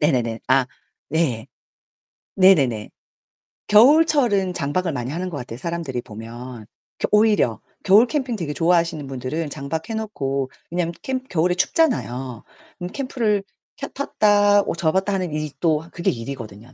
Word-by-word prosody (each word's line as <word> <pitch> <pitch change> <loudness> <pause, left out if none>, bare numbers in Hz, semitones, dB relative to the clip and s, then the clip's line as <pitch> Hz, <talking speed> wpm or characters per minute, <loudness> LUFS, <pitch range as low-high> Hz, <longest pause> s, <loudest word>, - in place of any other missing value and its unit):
네네네. 120 -7 +1
아. 130 -1 +4 0.4
네. 140 -8 0 0.9
네네네. 140 - +4 0.8
겨울철은 235 - +5
장박을 170 +3 -1
많이 125 -1 -4
하는 180 +4 -3
것 160 - -6
같아요, 120 -3 -7
사람들이 155 -4 -4
보면, 115 +1 -9 0.3
그 - - 0
오히려. 210 - +3 0.2
겨울 210 +6 +6
캠핑 260 -4 -2
되게 165 -8 -4
좋아하시는 165 -3 +1
분들은 135 +4 -4
장박 150 +5 -5
해 - - -3
놓고 140 -12 -3 0.2
왜냐면 170 0 -1
캠 260 -1 -3
겨울에 180 -7 0
춥잖아요. 135 - 0 0.3
그럼 180 -1 -6
캠프를 235 -7 0 0.4
켜 275 - -5
폈다 205 -6 +3
어 - - -3
접었다 190 +4 +1
하는 185 -4 -1
일이 150 -1 -3
또 160 -1 +1
그게 170 - 0
일이거든요. 115 -2 -8
165 Hz, 310 characters per minute, -22 LUFS, 130-205 Hz, 0.9 s, 겨울